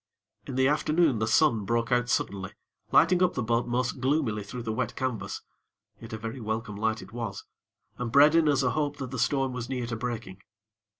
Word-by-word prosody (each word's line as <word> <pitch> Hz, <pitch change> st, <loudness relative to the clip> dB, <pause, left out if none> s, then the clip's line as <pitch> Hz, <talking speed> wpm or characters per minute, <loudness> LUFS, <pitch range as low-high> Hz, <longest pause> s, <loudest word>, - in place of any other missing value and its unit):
In 135 Hz, -, -5 dB
the 130 Hz, 0 st, +3 dB
afternoon, 150 Hz, -2 st, +2 dB
the 110 Hz, -, 0 dB
sun 115 Hz, -3 st, +3 dB
broke 115 Hz, +3 st, -1 dB
out 125 Hz, 0 st, +2 dB
suddenly, 100 Hz, -3 st, -1 dB, 0.4 s
lighting 175 Hz, +2 st, +5 dB
up 180 Hz, -1 st, +3 dB
the 125 Hz, -, -1 dB
boat 115 Hz, +2 st, 0 dB
most 125 Hz, +2 st, -1 dB
gloomily 130 Hz, -5 st, 0 dB
through 120 Hz, +4 st, -7 dB
the 110 Hz, -1 st, -2 dB
wet 120 Hz, +1 st, -2 dB
canvas; 130 Hz, -4 st, -3 dB, 0.6 s
yet 115 Hz, -, -10 dB
a 110 Hz, -, -4 dB
very 115 Hz, +4 st, -6 dB
welcome 110 Hz, 0 st, -3 dB
light 110 Hz, 0 st, -1 dB
it 95 Hz, +3 st, -15 dB
was, 115 Hz, -4 st, -5 dB, 0.5 s
and 125 Hz, -2 st, -3 dB
bred 145 Hz, +4 st, +7 dB
in 165 Hz, -2 st, +4 dB
us 140 Hz, -2 st, +2 dB
a 125 Hz, -, +2 dB
hope 145 Hz, -1 st, -1 dB
that 130 Hz, -3 st, -6 dB
the 130 Hz, -, -4 dB
storm 135 Hz, +1 st, +1 dB
was 125 Hz, -1 st, -5 dB
near 125 Hz, -2 st, -2 dB
to 115 Hz, -1 st, -4 dB
breaking. 115 Hz, -5 st, -5 dB
125 Hz, 205 wpm, -28 LUFS, 110-135 Hz, 0.6 s, bred